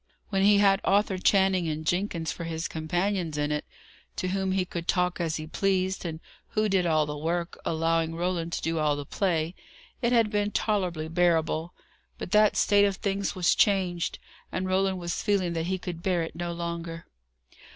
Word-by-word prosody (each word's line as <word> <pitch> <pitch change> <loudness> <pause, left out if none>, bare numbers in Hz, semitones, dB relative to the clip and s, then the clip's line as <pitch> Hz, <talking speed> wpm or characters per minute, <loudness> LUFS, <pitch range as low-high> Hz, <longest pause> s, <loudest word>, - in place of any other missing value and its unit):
When 195 -2 +1
he 205 +1 +6
had 195 -1 +4
Arthur 195 -1 +2
Channing 190 -2 +3
and 155 0 -3
Jenkins 175 -2 -1
for 170 - -6
his 160 0 -3
companions 175 +1 -1
in 150 0 0
it, 150 0 -2 0.5
to 185 - -2
whom 190 0 -1
he 190 -1 +1
could 170 -1 -6
talk 180 -1 +1
as 160 -2 -1
he 155 - -4
pleased, 190 +2 0
and 160 -2 -4 0.4
who 215 0 +3
did 190 -3 +2
all 155 -2 +3
the 150 0 -5
work, 170 +3 -2
allowing 165 0 0
Roland 170 -1 -1
to - - -3
do 165 0 0
all 150 -1 +2
the 145 0 -5
play, 170 -1 0 0.5
it 240 -1 +1
had 230 -3 +3
been 205 -1 +1
tolerably 185 -8 -1
bearable; 165 -1 +1 0.4
but - - -7
that 210 0 +4
state 205 0 +5
of 200 -1 0
things 200 0 -2
was 180 -2 +3
changed, 185 -4 +1 0.3
and 185 - -2
Roland 190 0 +1
was 170 -1 -3
feeling 195 -5 +1
that 165 0 -2
he 190 +1 0
could 175 -2 -6
bear 175 -2 +1
it 165 - -7
no 175 0 -3
longer. 170 -1 -5
175 Hz, 190 wpm, -27 LUFS, 165-195 Hz, 0.5 s, he